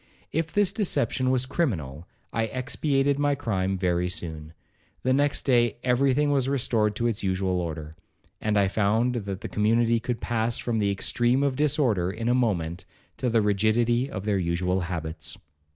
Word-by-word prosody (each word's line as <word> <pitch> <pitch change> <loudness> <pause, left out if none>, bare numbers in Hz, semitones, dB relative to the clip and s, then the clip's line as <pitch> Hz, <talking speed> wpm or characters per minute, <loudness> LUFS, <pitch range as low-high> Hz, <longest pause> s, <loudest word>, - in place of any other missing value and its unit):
If 160 +1 -1
this 205 -2 +2
deception 135 - +1
was 130 -1 +2
criminal, 90 - -2 0.3
I 115 -1 +1
expiated 135 +3 0
my 145 0 +2
crime 95 -8 -1
very 90 -1 0
soon. 80 -3 -5 0.5
The 130 - +2
next 145 +1 +1
day 120 -4 +2
every 130 +2 +3
thing 145 +1 +2
was 135 -2 +1
restored 115 -6 +1
to 120 - -2
its 115 -3 0
usual 95 -1 0
order, 80 -2 -6 0.5
and 105 -1 +1
I 100 -1 +4
found 110 +5 +1
that 100 -5 -4
the - - -4
community 115 +2 +2
could 120 +1 -3
pass 115 0 -1
from 115 -2 -1
the 100 -1 +1
extreme 120 +6 +1
of 140 -2 +1
disorder 130 - +2
in 115 +4 -3
a - - +4
moment 90 -9 0 0.3
to 125 - -1
the 115 -2 +2
rigidity 115 +5 +2
of 95 -7 -6
their 100 -2 +1
usual 90 +1 0
habits. 85 -3 -4
115 Hz, 170 wpm, -26 LUFS, 95-130 Hz, 0.5 s, I